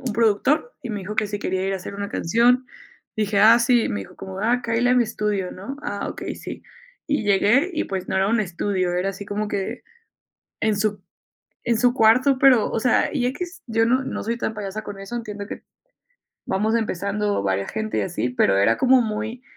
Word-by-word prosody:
un 255 -5 -3
productor, 235 - +1
y 245 - -5
me 210 -2 -4
dijo 200 +3 -6
que 215 - +2
si 205 0 -4
quería 190 -1 -2
ir 195 - 0
a - - -1
hacer 190 +1 -8
una 200 0 -4
canción. 240 +9 +2 0.5
Le 215 - +1
dije: 200 0 +1
"Ah, 225 +3 +8
sí". 240 -1 +3
Me 100 - -2
dijo, 95 - -11
como: 190 0 -8
"Ah, 240 +3 +1
cáele 235 +1 +1
a 250 - +4
mi 245 - +4
estudio", 210 -4 -2
¿no? 205 +9 -7
"Ah, 200 - -3
okey, - - -5
sí". - - -8 0.4
Y 290 -8 0
llegué, 210 - +3
y 310 - -1
pues 190 -1 -4
no - - -1
era 190 +1 +2
un 230 +1 +2
estudio, 185 -1 -1
era 185 +2 0
así 195 +1 -9
como 210 +1 -3
que 205 +5 -3 0.8
en 215 -2 +1
su 205 0 -1 0.6
en 235 -1 +1
su 245 0 +4
cuarto. 255 +3 +4
Pero, 255 -5 +5
o - - 0
sea, 250 +2 +2
y 260 -5 0
equis. 350 +7 -5
Yo 225 0 +2
no 255 +3 +2
no - - -4
soy 235 +2 -2
tan 220 - -2
payasa 210 0 -5
con 200 -1 -8
eso. 195 +5 -7
Entiendo 210 -3 -5
que, - - -8 0.8
vamos 215 +4 0
empezando 205 - -1
varia 95 0 -1
gente, 220 0 -3
y - - +2
así. 175 -9 -2
Pero 95 -5 +2
era 115 +3 +3
como 260 0 +5
muy 220 +2 -3
215 Hz, 220 wpm, -23 LUFS, 200-240 Hz, 0.8 s, Ah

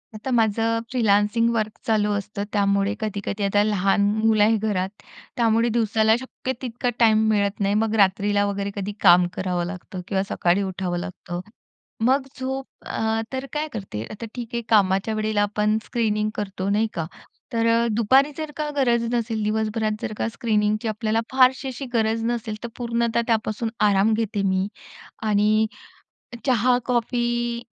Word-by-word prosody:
आता 220 +5 -5
माझं 225 -1 +2
freelancing 225 -1 +2
work 215 -1 0 0.2
चालू 210 -2 +2
असतं. 200 0 -5
त्यामुळे 200 0 +2
कधी-कधी 205 -1 -3
आता 205 +1 +3
लहान 200 -1 +2 0.2
मुलं 220 -1 +3
आहे 220 +2 +4
घरात, 200 -3 -1 0.5
त्यामुळे 230 0 +3
दिवसाला 220 -1 +3
शक्य 260 0 -5
तितका 245 -1 -2
टाईम 220 -2 +5
मिळत 200 -1 +1
नाही. 200 0 +1
मग 220 +1 +1
रात्रीला 205 0 +3
वगैरे 200 0 -2
कधी 200 0 -3
काम 180 -1 +6
करावं 180 -2 -2
लागतं 185 +1 -7
किंवा 190 -1 0
सकाळी 175 +3 +1
उठावं 185 -2 -3
लागतं, 175 -1 -6 0.6
मग 265 +4 +4 0.2
झोप 265 +1 -3 0.2
अ, 220 0 -1
तर 260 +1 -3
काय 300 +1 -1
करते, 190 - -5
आता 215 +2 -7
ठीक 240 -2 -5
आहे, 235 - -1
कामाच्या 200 0 +3
वेळेला 215 -1 0
आपण 210 +1 +1
स्क्रीनिंग 215 -3 0
करतो 195 -2 -3
नाही 210 +2 +2
का? 165 - -2 0.5
तर 230 0 +1
अ, 230 +1 +3
दुपारी 260 +7 +4
जर 310 -1 -4
का 305 -1 -2
गरज 240 -4 +2
नसेल, 225 -2 -1
दिवसभरात 215 0 -1
जर - - -3
का - - -1
स्क्रीनिंगची 215 -1 0
आपल्याला 220 +1 0
फारशी 260 +1 +4
अशी 265 +1 -5
गरज 225 0 +1
नसेल, 230 -2 -2
तर 235 - -4
पूर्णतः 235 -1 0
त्यापासून 225 0 0 0.2
आराम 200 +2 +3
घेते 215 -2 -1
मी 190 0 +1 0.6
आणि 215 +1 +3 0.8
चहा, 250 -1 +3
कॉफी 240 -1 0
215 Hz, 155 wpm, -23 LUFS, 205-235 Hz, 0.8 s, काम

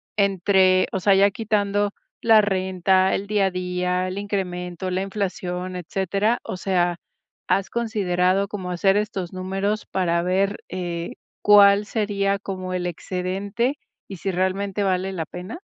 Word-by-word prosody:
entre, 190 -1 +3
o 190 - 0
sea, 200 +2 +4
ya 200 +1 +5
quitando 205 -1 0 0.3
la 225 -1 +6
renta, 190 -1 +2
el 200 - -4
día 205 -2 +2
a - - -2
día, 180 0 -1
el 185 +1 -5
incremento, 185 -3 -3
la 185 +1 -1
inflación, 185 -2 -3
etcétera. 195 +5 -1
O - - -5
sea, 175 -2 0 0.5
¿has 195 0 +1
considerado 195 -4 +1
como 190 -3 -5
hacer 195 +2 +2
estos 200 -4 -3
números 195 +3 -2
para 170 -3 0
ver, 195 +3 +1
eh, 170 -2 -4 0.3
cuál 205 0 +6
sería 200 -2 0
como 185 -2 -5
el 180 -1 -2
excedente 195 - -2 0.3
y 195 - -8
si 195 +3 -2
realmente 190 +2 -1
vale 190 0 0
la 165 -4 -3
pena? 180 - -8
190 Hz, 145 wpm, -23 LUFS, 180-200 Hz, 0.5 s, la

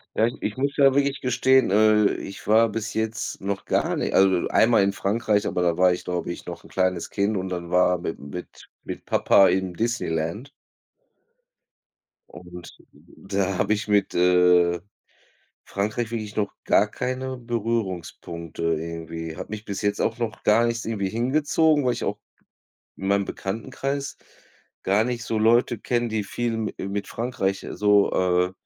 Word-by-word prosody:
Ja, 110 - +3
ich 120 - -1
ich 105 - -3
muss 140 +1 -1
ja 135 -2 +5
wirklich 140 0 +1
gestehen, 130 0 +3
äh, 105 +1 +4
ich 95 - -8
war 110 +2 +5
bis 115 +1 -4
jetzt 110 0 -3
noch 100 0 -3
gar - - 0
nicht - - -2
also, 95 -2 +4
einmal 115 -2 +4
in 100 - +2
Frankreich, 105 +1 0
aber 90 - -1
da 85 -2 +1
war 90 0 +5
ich 90 - -6
glaube 90 -1 -3
ich - - -9
noch - - -7
'n - - -14
kleines 90 -2 -1
Kind 100 +1 0
und 95 0 -3
dann 85 -2 -5
war 90 0 +3
mit'm 80 - -4
mit 90 - -9
mit - - -7
Papa 95 - +4
im 95 -1 -1
Disneyland. 105 - -2 1.8
Und 90 0 -12 0.3
da 95 0 -3
habe 105 - +2
ich 110 +1 -3
mit, 100 -2 +2
äh, 90 -1 +4 0.9
Frankreich 105 +3 -2
wirklich 110 -3 -5
noch 105 -1 -1
gar - - +4
keine 130 +1 -3
Berührungspunkte 100 -9 -4
irgendwie. 80 0 -3
Hat - - -7
mich 110 0 -6
bis 100 -2 -5
jetzt 100 0 0
auch 115 +1 0
noch 115 -2 -4
gar 115 +3 +4
nichts 115 0 -2
irgendwie 105 -4 -2
hingezogen, 145 +6 +2
weil 125 - +2
ich - - -5
auch - - -2 0.8
in 95 - -5
meinem 100 0 +2
Bekanntenkreis 135 +9 -4 0.7
gar 100 +3 +3
nicht 120 0 -3
so 110 0 -2
Leute 120 +2 +3
kenne, 120 -1 -1
die 110 -2 -1
viel 115 +3 -2
mi 110 -1 -3
äh, 95 - -4
mit 100 +1 -3
Frankreich 100 -5 -2
so, 105 -1 +3
äh, 90 0 +2
105 Hz, 170 wpm, -24 LUFS, 90-115 Hz, 1.8 s, ja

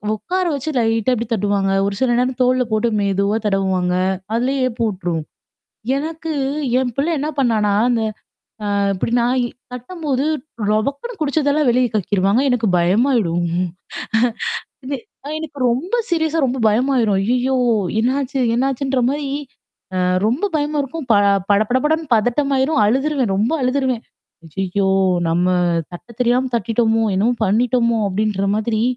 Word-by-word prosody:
உட்கார 370 - -2
வச்சு 280 +2 -4
லைட்டா 225 +1 +1
அப்படி 235 -1 -2
தட்டுவாங்க. 200 -2 0 0.2
ஒரு 200 0 -2
சில 260 - +2
நேரம் 255 +1 0
தோள்ல 255 0 +3
போட்டு 220 +2 +1
மெதுவா 200 +1 +1
தடவுவாங்க. 190 -3 +1 0.4
அதிலயே 260 +4 0
ஏப்பம் 230 -2 -1
உட்ரும். 175 -4 -3 0.7
எனக்கு, 320 +3 -4 0.5
என் 255 -1 0
பிள்ளை 290 +5 0
என்ன 295 +2 -2
பண்ணானா, 220 -6 +2 0.2
அந்த 235 -2 +1 0.7
அ - - +1 0.2
இப்டி 190 +4 -3
நா 235 - +2 0.5
தட்டும்போது 275 +1 -3 0.5
ரொபக்குன்னு 280 - -2
குடிச்சதெல்லாம் 290 -1 +1
வெளிய 250 0 +2
கக்கிருவாங்க. 200 +3 +1
எனக்கு 240 -3 +1
பயமாயிடும். 180 -2 +2 1.4
எனக் 270 -3 -4 0.3
எனக்கு 310 -3 -8
ரொம்ப 330 - -1
சீரியஸா 320 -1 +1
ரொம்ப 260 +1 -2
பயமாயிரும். 230 -2 +2
ஐய்யோ! 255 +2 +1 0.4
என்னாச்சு 270 +3 -1 0.2
என்னாச்சுன்ற 270 +1 0
மாரி. 285 0 -3 0.7
அ 185 - 0 0.3
ரொம்ப 255 - 0
பயமா 295 0 -1
இருக்கும். 285 +1 -6
ப - - +6 0.4
படபடபடன்னு 260 +10 +2
பதட்டமாயிரும் 265 +6 +1
அழுதுருவேன். 265 -1 +1
ரொம்ப 215 +7 +1
அழுதுருவேன். 255 -2 0 0.6
ஐய்யோ! 195 +1 0 0.4
நம்ம 175 +2 +1 0.5
தட்ட 175 +6 -10
தெரியாம 250 +2 +2
தட்டிட்டோமோ! 225 +1 +1
என்னவும் 230 +4 +1
பண்ணிட்டோமோ! 235 +2 +2
அப்படின்ற 200 0 -1
மாதிரி. 220 0 -1
245 Hz, 125 wpm, -19 LUFS, 215-275 Hz, 1.4 s, ப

